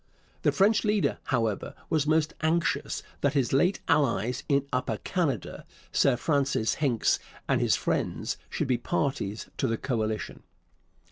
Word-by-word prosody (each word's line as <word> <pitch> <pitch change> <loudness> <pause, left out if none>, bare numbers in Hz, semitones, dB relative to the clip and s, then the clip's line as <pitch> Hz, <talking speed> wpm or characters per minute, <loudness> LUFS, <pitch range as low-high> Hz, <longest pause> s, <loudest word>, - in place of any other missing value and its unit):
The - - +3
French 205 +3 +3
leader, 210 -2 +1
however, 115 -5 -1 0.2
was 155 -2 +2
most 155 0 +2
anxious 165 +2 0 0.2
that 145 +1 +1
his 135 -3 +1
late 175 +8 +3
allies 125 -5 +2
in 140 -1 +3
Upper 125 - 0
Canada - - -2 0.3
Sir 135 -3 +4
Francis 140 -4 +1
Hincks 125 -7 +2 0.3
and - - +2
his - - +3
friends - - -1
should - - -2
be 125 -2 +1
parties 135 - -2
to 135 - +1
the 115 -1 0
coalition. 110 -4 -2
140 Hz, 140 wpm, -28 LUFS, 120-160 Hz, 0.3 s, Sir